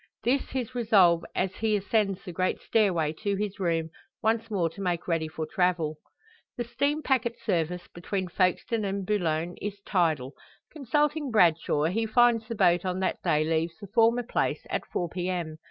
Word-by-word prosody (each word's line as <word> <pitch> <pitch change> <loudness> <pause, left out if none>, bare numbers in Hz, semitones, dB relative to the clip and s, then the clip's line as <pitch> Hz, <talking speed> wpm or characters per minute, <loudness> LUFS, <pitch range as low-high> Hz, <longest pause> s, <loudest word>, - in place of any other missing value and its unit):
This 260 +4 +2
his 255 -2 -3
resolve 200 -8 +4
as 190 0 -1
he 220 -1 +1
ascends 200 -1 0
the 180 - -5
great 185 +2 -1
stairway 175 -9 +1
to 200 -2 0
his 205 0 -3
room, 165 -3 0 0.3
once 225 +1 +1
more 190 -6 +1
to 165 +5 -8
make 175 -3 -2
ready 165 -2 0
for 155 0 -5
travel. 165 -2 0 0.6
The 240 - -1
steam 280 +6 -1
packet 245 -3 +1
service 175 -3 -1
between 185 +2 -4
Folkestone 185 +5 0
and 195 -1 -2
Boulogne 175 -4 -1
is 205 0 -4
"tidal." 155 -8 +1 0.4
Consulting 295 +1 0
Bradshaw, 170 -8 +3
he 215 +8 0
finds 230 0 +3
the 230 - -4
boat 175 -3 +3
on 185 0 -2
that 190 - -1
day 150 0 +2
leaves 160 +1 -1
the 205 - -8
former 230 +1 +4
place 240 - -1
at - - -2
4 175 - -2
p.m. 175 -3 -3
190 Hz, 170 wpm, -27 LUFS, 170-225 Hz, 0.6 s, resolve